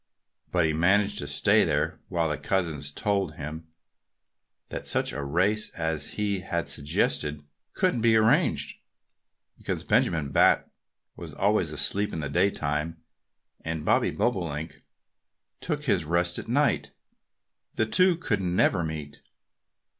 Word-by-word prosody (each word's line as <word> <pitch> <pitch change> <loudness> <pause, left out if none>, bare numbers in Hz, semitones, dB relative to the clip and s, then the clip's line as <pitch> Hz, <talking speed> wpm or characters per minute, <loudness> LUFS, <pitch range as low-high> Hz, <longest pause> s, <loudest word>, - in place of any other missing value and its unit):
But 90 -2 +2
he 80 - +1
managed 100 +6 +2
to 70 - -4
stay 70 - +4
there - - -1
while 85 -2 0
the 75 - -2
cousins 80 -7 -1
told 95 -1 -1
him 80 +3 -7 1.0
that - - -6
such - - 0
a 70 - -3
race 95 +9 +1
as 80 -3 -1
he 100 -2 -1
had 85 -2 -3
suggested 75 +1 -1 0.3
couldn't 120 - +1
be 115 -1 +4
arranged, 110 0 +2 0.8
because - - -3
Benjamin 80 -5 +1
Bat - - +4 0.5
was - - -9
always - - +1
asleep 100 +1 +1
in - - -3
the 70 -3 -3
daytime, 80 -2 0 0.7
and 80 -1 -4
Bobby - - +3
Bobolink 80 -3 -2 0.8
took 150 -3 -3
his 100 - +1
rest 85 +2 0
at - - -8
night. 140 +5 +1 0.8
The 110 - +2
two 185 +10 +4
could 170 - -1
never 90 0 +2
meet. 75 -2 -6
85 Hz, 130 wpm, -27 LUFS, 75-100 Hz, 1.0 s, stay